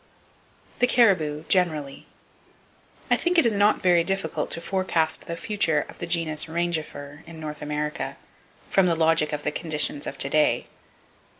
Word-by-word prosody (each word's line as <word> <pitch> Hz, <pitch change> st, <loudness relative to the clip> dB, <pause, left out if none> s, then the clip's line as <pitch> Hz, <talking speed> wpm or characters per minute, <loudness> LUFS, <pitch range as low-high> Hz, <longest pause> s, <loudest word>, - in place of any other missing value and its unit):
The 245 Hz, -, +4 dB
Caribou, 165 Hz, -12 st, +3 dB
Generally. 155 Hz, -7 st, 0 dB, 1.0 s
—I -, -, +7 dB
think 355 Hz, 0 st, 0 dB
it 330 Hz, -, +6 dB
is 230 Hz, -, +3 dB
not 205 Hz, +1 st, +2 dB
very 175 Hz, -2 st, +4 dB
difficult 190 Hz, -2 st, -2 dB
to -, -, -4 dB
forecast 170 Hz, -3 st, 0 dB
the 170 Hz, -, -4 dB
future 165 Hz, -7 st, 0 dB
of -, -, -14 dB
the 175 Hz, -, -4 dB
Genus 165 Hz, -3 st, +1 dB
Rangifer 160 Hz, -3 st, -4 dB
in 165 Hz, -1 st, -10 dB
North 150 Hz, -1 st, -7 dB
America, 150 Hz, 0 st, -4 dB, 0.5 s
from 195 Hz, -2 st, +4 dB
the 170 Hz, -, +2 dB
logic 160 Hz, -1 st, +3 dB
of 150 Hz, -1 st, -4 dB
the -, -, -1 dB
conditions 150 Hz, -2 st, -1 dB
of 135 Hz, -, -6 dB
to -, -, +1 dB
day. 155 Hz, 0 st, +2 dB
165 Hz, 160 wpm, -24 LUFS, 150-180 Hz, 1.0 s, I